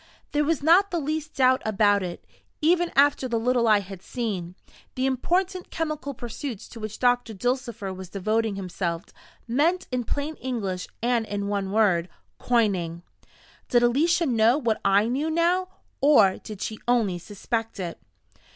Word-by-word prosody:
There 295 0 +2
was 300 -1 0
not 360 +6 +5
the 345 - -1
least 310 +1 -3
doubt 260 -1 +4
about 205 -1 +3
it, 180 -2 -6 0.3
even 345 +2 +2
after 280 -1 +4
the 235 -2 0
little 240 0 +2
I 210 -2 +5
had 195 -1 -10
seen: 190 -8 -4 0.4
the 260 - 0
important 360 +8 0
chemical 305 -4 -3
pursuits 240 -1 -6
to 230 - -10
which 215 -1 -6
Doctor 245 -3 +1
Dulcifer 235 -3 -2
was 185 -1 -9
devoting 215 +2 0
himself, 180 -2 -3 0.4
meant, 310 +10 +1
in 250 -1 -1
plain 290 +6 -3
English 200 -8 -3 0.2
and 235 -2 +1
in 200 0 -3
one 200 -2 -1
word 190 -5 +2 0.3
Coining. 185 -8 0 0.7
Did 240 -1 +4
Alicia 320 +8 +3
know 235 -1 +3
what 235 -7 -1
I 200 +2 +4
knew 275 +6 -1
now, 345 +3 +2 0.3
or 225 -10 +5
did 210 -2 -7
she 220 - -5
only 220 -7 +2
suspect 225 +4 -4
it? 175 -3 -5
235 Hz, 155 wpm, -25 LUFS, 200-285 Hz, 0.7 s, not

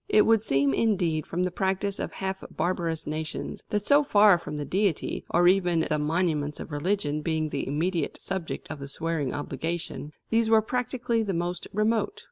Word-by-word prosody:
It 210 - +5
would 225 -2 +4
seem, 140 -9 +2
indeed, 175 -6 +1
from 175 +2 -1
the 180 - 0
practice 195 +2 -1
of - - -4
half 190 0 -4
barbarous 170 -3 -2
nations, 155 +1 -4
that 210 -1 0
so 285 +1 +6
far 205 -8 +5
from 150 -2 -6
the 145 - -3
Deity, 195 -2 0
or 175 +1 +4
even 175 -3 +3
the 155 -1 0
monuments 150 -1 0
of - - -7
religion, 150 -1 -1
being 155 0 -1
the 140 - -3
immediate 160 +3 -1
subject 190 -5 -4
of 155 - -6
the 140 - -6
swearing 150 -2 -2
obligation, 155 0 -4 0.2
these 225 0 +3
were 220 -1 +5
practically 245 0 -1
the 200 -4 -1
most 175 +1 -2
remote. 225 - 0
175 Hz, 180 wpm, -27 LUFS, 155-205 Hz, 0.2 s, so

